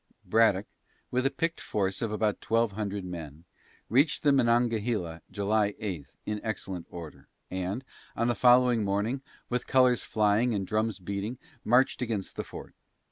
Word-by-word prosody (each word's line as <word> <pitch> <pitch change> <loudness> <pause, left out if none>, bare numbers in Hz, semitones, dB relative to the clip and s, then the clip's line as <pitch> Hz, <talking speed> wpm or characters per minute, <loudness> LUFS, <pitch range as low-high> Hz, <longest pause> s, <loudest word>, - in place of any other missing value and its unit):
Braddock, 110 -3 +3 0.5
with 125 +2 +2
a - - +2
picked 165 +3 -2
force 95 -2 -1
of 115 - -1
about 105 -1 0
twelve 115 -1 +2
hundred 100 -1 -3
men, 80 -3 -7 0.4
reached 140 +6 +3
the 145 - +5
Monongahela 115 - +1
July 105 0 +1
8 90 - -4 0.2
in 105 0 -3
excellent 95 -5 -4
order, 85 -3 -9 0.2
and, 95 +7 -3 0.3
on 115 - +1
the 120 - +3
following 125 -1 +5
morning, 105 +7 0 0.3
with 125 0 -2
colors 125 -2 +4
flying 110 +2 +2
and 100 -1 -1
drums 110 +1 0
beating, 100 +5 -4 0.3
marched 125 +3 +3
against 110 -6 -3
the - - -3
fort. - - -10
110 Hz, 150 wpm, -29 LUFS, 100-120 Hz, 0.5 s, the